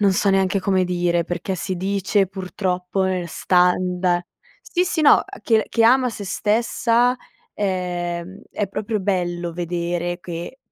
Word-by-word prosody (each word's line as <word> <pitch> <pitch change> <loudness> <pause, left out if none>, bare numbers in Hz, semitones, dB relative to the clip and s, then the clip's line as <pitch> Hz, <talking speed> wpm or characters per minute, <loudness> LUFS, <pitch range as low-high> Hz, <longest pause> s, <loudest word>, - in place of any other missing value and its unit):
non 200 -2 +4
so 195 +1 +2
neanche 195 0 +2
come 190 -1 +2
dire, 175 -1 0
perché 175 +2 -3
si 185 +1 -3
dice 195 +1 +1
purtroppo 185 0 -2
nel 185 -2 -1
standa 180 0 +2 0.4
sì, 360 -7 0
sì, 340 -2 -1
no, 300 - +8
uhm, - - +1 0.2
che 220 -2 +2
che 230 - +1
ama 250 +2 +5
sé 210 -2 -7
stessa, 235 +4 +1 0.4
ehm, 180 -1 -3
è 205 - -2
proprio 210 +2 -3
bello 175 -3 -1
vedere 175 0 -2
che 175 +7 -7
185 Hz, 145 wpm, -22 LUFS, 175-205 Hz, 0.4 s, no